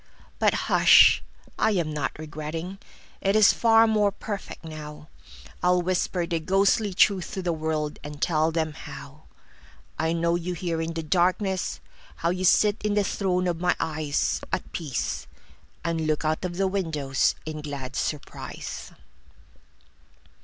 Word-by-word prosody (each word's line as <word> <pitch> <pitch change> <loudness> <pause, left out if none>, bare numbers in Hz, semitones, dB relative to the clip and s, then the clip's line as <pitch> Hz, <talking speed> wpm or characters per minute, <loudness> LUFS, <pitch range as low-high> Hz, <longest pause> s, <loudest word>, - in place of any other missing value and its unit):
But - - +3
hush, - - +7 0.4
I 220 - +3
am 165 -5 -1
not 145 -3 -3
regretting:It 160 +6 -5
is 215 -2 +7
far 225 -1 +5
more 210 -2 +2
perfect 200 -4 -7
now. 150 -1 -9 0.5
I'll 180 0 +3
whisper 180 -1 0
the 170 -1 -1
ghostly 195 +5 +2
truth 190 -2 +3
to 190 - -3
the 175 -1 0
worldAnd 150 -2 -3
tell 155 0 +2
them 160 -1 -1
howI 140 - -8
know 170 0 +1
you 175 +1 -2
here 170 -2 -2
in 165 +1 -3
the 165 0 -4
darkness, 185 +3 0 0.4
How 170 - 0
you 185 +1 -1
sit 205 +3 +4
in 210 -1 0
the 205 - +3
throne 185 -2 0
of 170 -1 -2
my 180 0 +2
eyesAt 155 -2 -1
peace, 120 - -3 0.6
and 165 -2 -1
look 155 0 0
out 155 +3 0
of 175 -1 -4
the 195 - +2
windowsIn 155 -4 -1
glad 140 -3 -6
surprise. 150 -2 -5
165 Hz, 135 wpm, -26 LUFS, 155-185 Hz, 0.6 s, hush